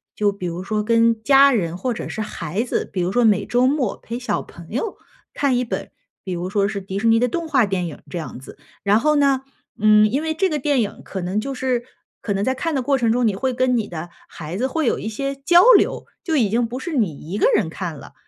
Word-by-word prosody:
就 205 -1 +2
比 195 -2 -7
如 175 +1 -4
说 210 +2 -1
跟 230 0 +2
家 275 +2 +6
人 175 -9 0
或 250 +8 -2
者 - - -6
是 220 - -4
孩 205 -2 -3
子， 250 - -2
比 185 - -2
如 175 +1 0
说 245 +3 +3
每 210 -3 +3
周 245 +1 +2
末 265 -6 0
陪 235 +2 -6
小 250 - -2
朋 170 -1 -14
友 385 - -3 0.4
看 275 -3 +1
一 250 - 0
本， - - -4 0.3
比 190 - -6
如 180 +1 -4
说 200 -1 +2
是 200 -1 -3
迪 195 0 -5
士 225 - 0
尼 225 0 +5
的 250 - +2
动 335 +7 -3
画 265 -6 +4
电 190 -3 -2
影 160 - -9
这 175 - -3
样 160 - -7
子。 130 - -13 0.3
然 205 +2 +4
后 305 +4 +2
呢， 275 -2 +3 0.4
嗯， 215 0 +5
因 275 +5 0
为 320 0 -1
这 380 +4 +1
个 305 - -1
电 285 -2 +1
影 210 - -4
可 190 - -6
能 185 +4 -1
就 275 +5 -4
是 255 -2 -1 0.4
可 205 - -2
能 195 0 -1
在 260 - +1
看 330 +4 -2
的 265 - +1
过 275 +2 +1
程 235 -3 +1
中， 240 0 +2
你 205 - 0
会 260 +5 -1
跟 250 0 +2
你 220 - -2
的 170 0 -7 0.2
孩 165 +3 -7
子 245 - 0
会 315 +3 -1
有 - - +2
一 - - -5
些 275 +5 -3
交 345 +6 +5 0.2
流， - - -1 0.2
就 325 - -1
已 225 -7 +2
经 235 +3 +1
不 245 +3 -5
是 340 +5 -5
你 205 - 0
一 200 - -2
个 - - +4
人 - - +1
看 - - -5
了， - - -12
230 Hz, 280 characters per minute, -21 LUFS, 200-265 Hz, 0.4 s, 家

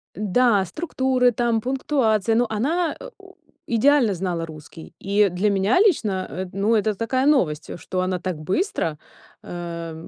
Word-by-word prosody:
Да, 210 +1 +2
структуры 260 - 0
там, 235 0 0
пунктуации, 235 -4 0
но 240 +2 +3
она, 315 +11 -1
э, - - -9
у - - -16 0.3
идеально 240 -1 +3
знала 175 -2 -3
русский, 155 0 -12
и 200 +1 +2
для 185 +4 0
меня 200 - +2
лично, 220 - +1
э, 185 +7 -5
ну 205 +4 +1
это 215 0 +1
такая 255 +5 -1
новость, 165 - +1
что 185 +2 -3
она 185 0 -1
так 180 -2 -4
быстро, 165 - -2 0.4
э, 170 -1 -6
210 Hz, 150 wpm, -22 LUFS, 185-255 Hz, 0.4 s, но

